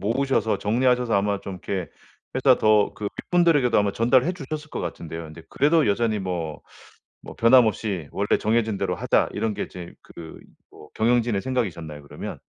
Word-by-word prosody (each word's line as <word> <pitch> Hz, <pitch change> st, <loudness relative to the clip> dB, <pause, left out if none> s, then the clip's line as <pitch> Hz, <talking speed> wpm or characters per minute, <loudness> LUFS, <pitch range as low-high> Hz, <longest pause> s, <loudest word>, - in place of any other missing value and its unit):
모으셔서 115 Hz, +1 st, 0 dB
정리하셔서 125 Hz, +2 st, +1 dB
아마 100 Hz, 0 st, +1 dB
좀 95 Hz, -, -7 dB
이렇게 90 Hz, -5 st, -4 dB, 0.4 s
회사 130 Hz, -1 st, +4 dB
더 105 Hz, -1 st, +3 dB
그 105 Hz, -, -5 dB, 0.2 s
윗분들에게도 165 Hz, -10 st, +3 dB
아마 100 Hz, -1 st, +1 dB
전달해 130 Hz, +8 st, +2 dB
주셨을 155 Hz, -1 st, -7 dB
것 -, -, -4 dB
같은데요. 85 Hz, -1 st, -6 dB
근데 80 Hz, +1 st, -11 dB
그래도 155 Hz, +2 st, +3 dB
여전히 110 Hz, +1 st, +1 dB
뭐 85 Hz, -4 st, -4 dB, 0.6 s
뭐 -, -, -10 dB
'변함없이 110 Hz, -, +3 dB
원래 100 Hz, +2 st, +1 dB
정해진 110 Hz, -2 st, 0 dB
대로 -, -, -1 dB
하다.' -, -, +1 dB
이런 110 Hz, +1 st, -1 dB
게 -, -, -3 dB
이제 90 Hz, -1 st, -10 dB
그 80 Hz, -1 st, -11 dB, 0.3 s
뭐 75 Hz, -, -15 dB
경영진의 115 Hz, -3 st, +1 dB
생각이셨나요 85 Hz, -, -3 dB
그러면? 70 Hz, -, -8 dB
110 Hz, 390 characters per minute, -24 LUFS, 95-125 Hz, 0.6 s, 회사